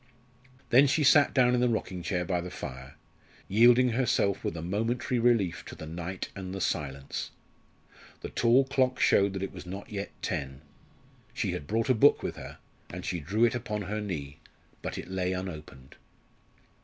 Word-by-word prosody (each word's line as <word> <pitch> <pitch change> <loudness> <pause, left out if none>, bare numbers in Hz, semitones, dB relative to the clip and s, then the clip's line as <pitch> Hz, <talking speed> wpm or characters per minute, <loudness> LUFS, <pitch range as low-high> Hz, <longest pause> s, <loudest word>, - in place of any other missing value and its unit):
Then 130 +4 +7
she 150 +3 +2
sat 145 +1 +6
down 125 -2 +4
in 125 - +2
the 125 - +3
rocking 95 -5 -2
chair 90 0 -2
by 90 0 -1
the 90 - -6
fire, 65 -4 -8 0.5
yielding 120 +4 +5
herself 115 -5 +1
with 85 - -3
a - - -4
momentary 115 +7 -1
relief 115 -7 +2
to - - -9
the - - -8
night 85 +3 -5
and 95 -1 -6
the - - -4
silence. 70 -5 -3 0.9
The - - -6
tall 120 +3 +4
clock 130 -1 +1
showed 100 0 +4
that 95 0 -4
it 95 - -5
was 90 -1 -10
not 95 +3 -7
yet 100 -1 -4
ten. 70 -5 -3 0.7
She - - -1
had 70 - -5
brought 115 +1 0
a 130 - +4
book 135 +5 +4
with - - -3
her, - - -9 0.3
and 90 +1 -7
she 90 - -2
drew 100 +10 +2
it 115 - +1
upon 105 -3 -3
her 105 +3 -3
knee; 75 -8 -5 0.4
but - - -5
it - - -6
lay 95 -1 -1
unopened. 75 -8 -8
100 Hz, 180 wpm, -29 LUFS, 85-120 Hz, 0.9 s, Then